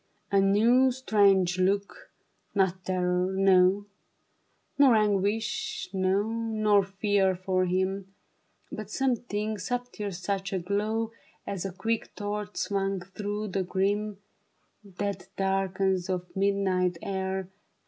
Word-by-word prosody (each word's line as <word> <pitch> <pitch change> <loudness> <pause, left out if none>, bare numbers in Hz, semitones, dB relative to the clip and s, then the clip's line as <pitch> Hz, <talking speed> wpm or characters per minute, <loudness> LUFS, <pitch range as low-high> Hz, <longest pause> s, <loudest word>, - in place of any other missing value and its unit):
A 200 -1 +4
new, 230 +7 +4
strange 200 -7 +3
look, 200 +2 0 0.5
not 190 -1 +1
terror, 180 0 0
no, 190 +1 +4 0.9
Nor 270 -5 +7
anguish, 210 0 0
no, 190 +1 +2
nor 215 -2 +1
fear 195 0 +1
for 185 0 0
him; 190 +1 -1 0.6
But 215 -2 -6
something 220 -4 -1
subtiler, 245 0 -3
such 195 +1 -3
a - - +1
glow 210 +5 -1 0.3
As 195 -2 -4
a 195 - -3
quick 225 +5 -3
torch 210 0 -4
swung 195 -1 -1
through 210 0 -3
the 190 +1 -1
grim, 200 +3 -1 0.8
Dead 200 -1 -3
darkness 190 -1 0
of 180 -1 -1
the - - -4
midnight 190 -3 +1
air. 190 -1 -3
195 Hz, 115 wpm, -28 LUFS, 190-210 Hz, 0.9 s, Nor